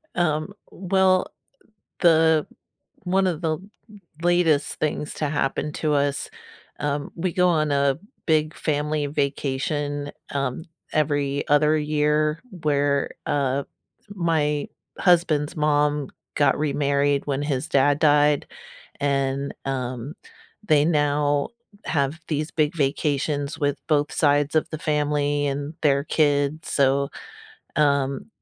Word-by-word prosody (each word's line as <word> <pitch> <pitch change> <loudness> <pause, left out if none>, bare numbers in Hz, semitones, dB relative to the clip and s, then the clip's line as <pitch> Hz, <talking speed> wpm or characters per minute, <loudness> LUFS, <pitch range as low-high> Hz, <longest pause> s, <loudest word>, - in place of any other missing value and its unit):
Um, 165 +1 0 0.2
well, 185 0 +2 0.7
the 160 -2 +4 0.6
one 190 +1 +2
of 165 -4 -2
the 165 -2 0
l - - -16 0.6
latest 175 -4 +2
things 150 -1 -2
to 150 - -1
happen 145 0 -1
to 155 -2 -1
us, 140 -1 0 0.5
um 145 0 -2
we 175 0 -2
go 180 -1 +3
on 155 -3 +1
a 140 0 +2 0.3
big 155 -1 +1
family 150 0 -1
vacation, 145 +1 -2 0.2
um, 140 +1 -2 0.3
every 145 -2 0
other 150 +1 +4
year 150 +1 +1 0.2
where, 140 -1 +1
uh, 140 -1 0 0.5
my 160 -6 0 0.3
husband's 165 -5 +2
mom 150 -2 +1 0.3
got 145 -1 +3
remarried 140 -1 +1
when 140 -1 -1
his 145 0 -2
dad 140 +1 +3
died, 145 -1 +3 0.5
and, 140 0 0
um, 130 +1 -4 0.5
they 150 -5 +4
now 145 -2 +1 0.4
have 145 +1 0
these 155 0 -2
big 155 +1 0
vacations 145 0 -1
with 145 -2 0
both 150 -1 +2
sides 145 -1 +2
of 155 - +2
the 155 - -5
family 145 -1 0
and 145 +2 -3
their 140 -2 +3
kids, 145 0 +1
so, 140 0 +2 0.7
um, 140 -2 +1
145 Hz, 115 wpm, -24 LUFS, 140-155 Hz, 0.7 s, the